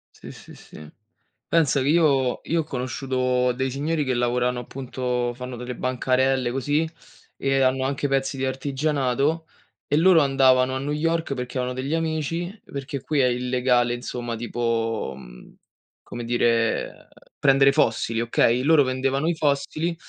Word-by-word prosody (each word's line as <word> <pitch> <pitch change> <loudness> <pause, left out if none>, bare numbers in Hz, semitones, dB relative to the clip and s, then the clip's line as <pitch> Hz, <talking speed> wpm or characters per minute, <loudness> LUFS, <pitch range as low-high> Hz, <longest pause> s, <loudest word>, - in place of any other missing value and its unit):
Sì, - - -11
sì, - - -14
sì. 75 0 -13 0.6
Pensa 150 -5 +2
che 130 - -1
io 140 -6 +2
io 165 0 +1
ho - - -5
conosciuto 125 -1 -1
dei 130 +1 -2
signori 150 +3 -1
che 130 -2 -1
lavorano 125 +1 0
appunto 125 -1 -3
fanno 125 0 -7
delle 125 +1 -6
bancarelle 130 0 0
così 145 +5 0 0.5
e 135 0 +1
hanno 130 0 +2
anche 140 +1 -1
pezzi 135 0 0
di 130 - -1
artigianato, 140 +3 -1 0.4
e 145 - +1
loro 170 0 +6
andavano 130 -2 +3
a - - -2
New 145 +2 -3
York 165 0 -1
perché 125 +1 -5
avevano 125 0 -3
degli 135 +4 -2
amici, 165 +5 -3
perché 140 -1 -6
qui 150 +2 -1
è 130 - +4
illegale, 125 0 +1
insomma, 120 -1 -5
tipo, 115 - -2
mhmm, - - -14 0.5
come 120 -1 -7
dire, 115 -1 0 0.3
prendere 135 0 +5
fossili, 115 -1 +1
okay? 120 +1 +2
Loro 155 -1 +5
vendevano 135 +3 -1
i 170 - +1
fossili 155 +3 -1
130 Hz, 150 wpm, -24 LUFS, 125-145 Hz, 0.6 s, loro